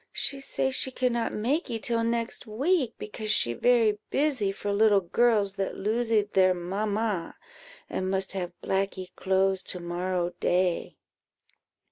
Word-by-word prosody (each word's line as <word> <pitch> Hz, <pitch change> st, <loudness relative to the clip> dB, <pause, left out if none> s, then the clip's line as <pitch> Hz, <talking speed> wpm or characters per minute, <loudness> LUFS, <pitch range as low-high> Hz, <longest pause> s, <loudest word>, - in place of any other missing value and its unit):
She 275 Hz, -, 0 dB
say 265 Hz, 0 st, -1 dB
she 260 Hz, -, +2 dB
cannot 245 Hz, -2 st, 0 dB
makee 240 Hz, +3 st, -1 dB
till 230 Hz, +1 st, 0 dB
next 230 Hz, +1 st, -2 dB
week, 260 Hz, +3 st, 0 dB
because 215 Hz, 0 st, -6 dB
she 120 Hz, -, +3 dB
very 225 Hz, -, +3 dB
busy 270 Hz, -9 st, +1 dB
for 200 Hz, +1 st, -3 dB
little 205 Hz, -1 st, +4 dB
girls 205 Hz, +1 st, +2 dB
that 195 Hz, -1 st, -2 dB
losee 225 Hz, +1 st, +1 dB
their 185 Hz, -1 st, +4 dB
mamma, 200 Hz, +1 st, -2 dB, 0.5 s
and 185 Hz, -, -2 dB
must 190 Hz, 0 st, -1 dB
have 180 Hz, -3 st, -4 dB
blackee 190 Hz, -1 st, -2 dB
clothes 190 Hz, 0 st, +1 dB
to 180 Hz, -, -5 dB
morrow 175 Hz, 0 st, -2 dB
day." 180 Hz, -1 st, 0 dB
210 Hz, 135 wpm, -27 LUFS, 190-235 Hz, 0.5 s, little